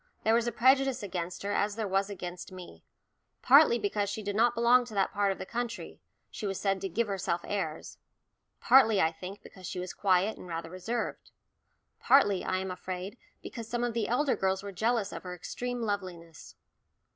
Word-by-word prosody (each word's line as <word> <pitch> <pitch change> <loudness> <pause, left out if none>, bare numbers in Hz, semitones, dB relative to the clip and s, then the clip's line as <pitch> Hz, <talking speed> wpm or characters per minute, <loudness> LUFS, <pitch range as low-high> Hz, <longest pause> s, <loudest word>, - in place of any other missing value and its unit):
There 220 - +3
was 235 +1 +2
a - - 0
prejudice 260 +1 +3
against 180 -2 -4
her 200 - -2
as 205 0 0
there 220 -2 -2
was 195 +1 0
against 180 -3 -7
me: 185 -1 -11 0.6
partly, 475 0 +7
because 205 - -1
she 210 +1 -4
did 200 0 -3
not 235 +2 +3
belong 240 +2 +5
to 225 -3 -10
that 195 -1 +1
part 205 -1 +2
of 195 - -4
the - - -6
country, 240 +2 -5 0.3
she 210 - -4
was 195 -1 -3
said 195 -2 0
to 195 - -3
"give 230 +7 0
herself 190 -4 -2
airs"; 165 -6 -4 0.6
partly, 225 -5 +5
I 160 - +3
think, 185 +4 -9
because 185 -2 -11
she - - -5
was 180 0 -5
quiet 195 +2 +1
and - - -10
rather 165 -1 -5
reserved; 225 +6 -4 0.7
partly, 205 -9 +4
I 185 - -1
am 190 0 -3
afraid, 185 +2 -6 0.3
because 230 -3 -7
some 240 +1 -2
of 240 -1 -1
the 225 -2 -1
elder 260 +3 +1
girls 190 0 0
were 200 - -6
jealous 220 +2 0
of - - -6
her 180 -1 -7
extreme 245 +7 -4
loveliness. 185 -6 -5
200 Hz, 195 wpm, -30 LUFS, 185-235 Hz, 0.7 s, partly